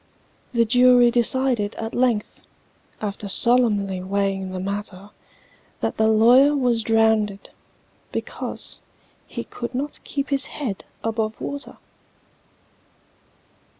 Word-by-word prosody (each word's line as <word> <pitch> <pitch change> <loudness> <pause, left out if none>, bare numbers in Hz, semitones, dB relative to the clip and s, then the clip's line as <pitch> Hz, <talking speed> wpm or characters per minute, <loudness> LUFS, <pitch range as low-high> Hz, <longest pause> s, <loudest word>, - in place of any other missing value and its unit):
The 235 -2 +2
jury 245 +1 +5
decided 240 -3 +1
at 225 0 -5
length, 240 -4 0 0.6
After 205 -1 -4
solemnly 205 -5 +3
weighing 195 0 -1
the 185 - -5
matter, 200 0 -5 0.7
That - - -2
the 220 - +3
lawyer 245 +7 +5
was 245 -4 +1
drownded, 220 -2 +1 0.6
because - - -6 0.5
He - - -6
could 240 +1 -7
not 280 +3 -4
keep 280 -1 -4
his 275 -1 0
head 240 -10 -5 0.2
above 220 -1 -2
water! 285 0 -6
225 Hz, 105 wpm, -22 LUFS, 205-250 Hz, 0.7 s, jury